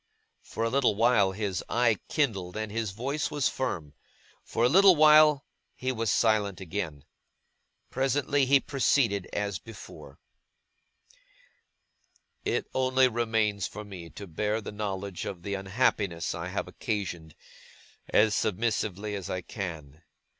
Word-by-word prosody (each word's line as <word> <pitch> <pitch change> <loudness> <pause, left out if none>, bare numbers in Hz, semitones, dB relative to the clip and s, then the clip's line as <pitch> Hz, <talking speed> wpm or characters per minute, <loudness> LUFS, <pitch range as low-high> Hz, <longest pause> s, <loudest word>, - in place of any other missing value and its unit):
For 115 - -5
a 115 - +1
little 130 -5 +2
while, 110 -3 +3
his 95 -2 -3
eye 115 -4 +2
kindled 100 - -1
and 110 -1 -4
his 110 -1 -2
voice 130 +10 -3
was 145 -3 0
firm; 80 - -3 0.5
for 115 - -2
a - - +6
little 190 +6 +7
while 150 -1 +6 0.3
he 130 0 -2
was 115 -3 -2
again 105 -3 +2
silent. 80 -6 -5 0.9
Presently, 135 +1 +1
he 140 +1 +6
proceeded 125 -9 +1
as 100 -2 -2
before: 115 - -12 2.3
'It - - -1
only 130 0 +3
remains 110 -4 0
for 105 0 -9
me, 90 -5 -9
to 100 - -9
bear 105 +5 -1
the 110 - -7
knowledge 100 -2 -4
of 90 -3 -6
the 100 - -3
unhappiness 95 -3 0
I - - -5
have - - -3
occasioned, 85 -7 -4 0.7
as 105 0 +4
submissively 105 -1 -1
as 100 -3 -5
I 90 - -2
can. 80 -6 -7
105 Hz, 130 wpm, -28 LUFS, 95-125 Hz, 2.3 s, little